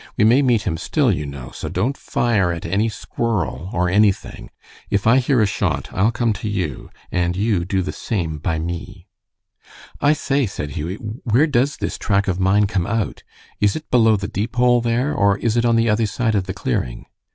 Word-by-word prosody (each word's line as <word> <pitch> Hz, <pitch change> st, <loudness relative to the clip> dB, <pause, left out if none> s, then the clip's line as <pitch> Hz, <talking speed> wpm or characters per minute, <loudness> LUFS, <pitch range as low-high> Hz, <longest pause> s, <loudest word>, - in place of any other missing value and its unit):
We 115 Hz, -, +3 dB
may 120 Hz, +6 st, +5 dB
meet 120 Hz, -6 st, +2 dB
him 80 Hz, -, -2 dB
still, -, -, +1 dB
you 75 Hz, 0 st, -2 dB
know, 70 Hz, -3 st, -8 dB
so -, -, -6 dB
don't 115 Hz, +10 st, -1 dB
fire 105 Hz, -11 st, 0 dB
at 85 Hz, -1 st, -5 dB
any 105 Hz, +4 st, +1 dB
squirrel 105 Hz, -5 st, -3 dB
or 90 Hz, +1 st, +1 dB
anything. 100 Hz, +1 st, +1 dB, 0.4 s
If 100 Hz, -, 0 dB
I 115 Hz, +3 st, +6 dB
hear 130 Hz, -1 st, +2 dB
a -, -, +5 dB
shot 100 Hz, -, -1 dB
I'll 100 Hz, +4 st, +3 dB
come 115 Hz, -1 st, 0 dB
to 110 Hz, -, -2 dB
you, 90 Hz, -10 st, -3 dB, 0.2 s
and 90 Hz, 0 st, 0 dB
you 100 Hz, -4 st, +1 dB
do 95 Hz, 0 st, 0 dB
the 95 Hz, -, -3 dB
same 80 Hz, -8 st, -3 dB
by 80 Hz, +1 st, -1 dB
me." 85 Hz, +1 st, -6 dB, 0.9 s
"I 145 Hz, -, +4 dB
say," 140 Hz, -3 st, 0 dB
said 75 Hz, -6 st, -5 dB
Hughie, 80 Hz, +7 st, -4 dB
"where 115 Hz, +5 st, 0 dB
does 140 Hz, -1 st, +1 dB
this -, -, -4 dB
track 100 Hz, -1 st, +1 dB
of 95 Hz, -1 st, -1 dB
mine 95 Hz, +2 st, +3 dB
come 95 Hz, -4 st, -1 dB
out? 110 Hz, -1 st, -2 dB, 0.4 s
Is 105 Hz, -1 st, +2 dB
it 155 Hz, -, -7 dB
below 110 Hz, -3 st, +5 dB
the 100 Hz, 0 st, -4 dB
Deepole 120 Hz, +4 st, +1 dB
there, 120 Hz, +5 st, 0 dB
or 100 Hz, 0 st, +2 dB
is 115 Hz, +1 st, 0 dB
it 120 Hz, 0 st, +2 dB
on 115 Hz, -1 st, +3 dB
the 115 Hz, 0 st, +3 dB
other 110 Hz, +1 st, +2 dB
side 115 Hz, +2 st, -1 dB
of 100 Hz, -3 st, 0 dB
the 95 Hz, -, -3 dB
clearing?" -, -, -3 dB
105 Hz, 205 wpm, -20 LUFS, 90-115 Hz, 0.9 s, I